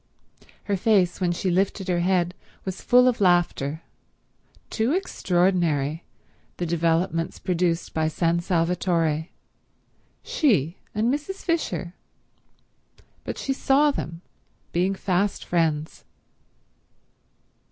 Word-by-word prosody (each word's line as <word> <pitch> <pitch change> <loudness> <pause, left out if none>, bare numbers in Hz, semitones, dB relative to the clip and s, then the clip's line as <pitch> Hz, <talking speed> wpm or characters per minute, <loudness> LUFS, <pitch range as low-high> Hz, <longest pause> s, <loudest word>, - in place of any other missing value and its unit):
Her 200 - -1
face 195 -3 +2
when 180 -1 +2
she 180 +2 -1
lifted 190 +1 0
her 175 -1 +1
head 175 -1 +1 0.3
was 190 -1 -5
full 250 +1 +5
of 245 -4 +1
laughter. 170 -4 +2 0.9
Too 230 +5 +1
extraordinary, 175 - 0 0.5
the 175 - -2
developments 165 +1 0
produced 175 -2 -1
by 160 -1 +1
San 165 +2 +1
Salvatore. 170 -2 0 1.0
She 185 - +1 0.2
and 225 +4 +2
Mrs. 300 +7 -5
Fisher... 320 - -1 1.3
but - - -5
she 270 - -1
saw 280 +2 +3
them 165 - -5 0.5
being 185 +3 +1
fast 195 +1 -1
friends. 160 -3 -1
180 Hz, 100 wpm, -24 LUFS, 165-200 Hz, 1.3 s, full